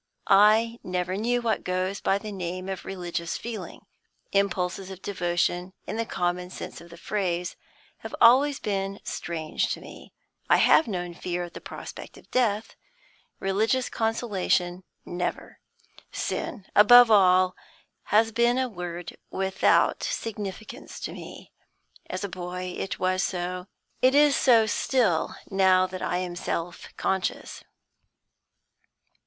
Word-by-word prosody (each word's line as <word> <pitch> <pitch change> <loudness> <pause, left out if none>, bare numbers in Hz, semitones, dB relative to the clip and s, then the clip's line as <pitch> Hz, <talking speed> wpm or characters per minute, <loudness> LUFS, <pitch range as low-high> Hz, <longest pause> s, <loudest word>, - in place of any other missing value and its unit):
I 220 +4 +5
never 180 0 -2
knew 240 +4 0
what 225 -2 0
goes 185 +2 -2
by 195 - +2
the 210 +1 -7
name 185 -1 -5
of 190 -2 -5
religious 175 -3 -4
feeling; 230 -2 -7 0.5
impulses 190 -1 0
of 190 -1 -10
devotion, 175 -1 -1
in 215 - -4
the 230 0 -2
common 180 0 -2
sense - - -8
of 170 - -14
the 170 - -12
phrase, 180 -2 -2 0.4
have - - -7
always 270 +5 +6
been 195 -1 -2
strange 160 -2 -3
to - - -6
me. - - -12 0.4
I - - +6
have 320 - +5
known 180 -4 -3
fear 175 +1 -3
at 175 - -9
the - - -9
prospect - - -9
of - - -18
death; 225 -3 0 0.6
religious 220 +6 +1
consolation, 195 -5 0 0.2
never. 175 0 -4 0.5
Sin, 205 -7 -4
above 240 +3 +8
all, 185 -2 +5 0.5
has 225 +2 +3
been 235 +2 +2
a 260 0 +1
word 175 -5 -6
without 190 0 +2
significance 210 -2 -5
to - - -4
me. - - -10 0.6
As 185 - -4
a - - -1
boy, 180 0 -5
it 195 - -4
was 185 0 +1
so; 180 0 -3 0.3
it 260 +2 +4
is 290 -1 +6
so 230 -4 +5
still, 215 -5 +1 0.2
now 190 -1 +4
that 185 0 -7
I 180 - -1
am 180 -1 -3
self 175 0 -4
conscious. 190 -2 -2
190 Hz, 135 wpm, -26 LUFS, 180-220 Hz, 0.6 s, above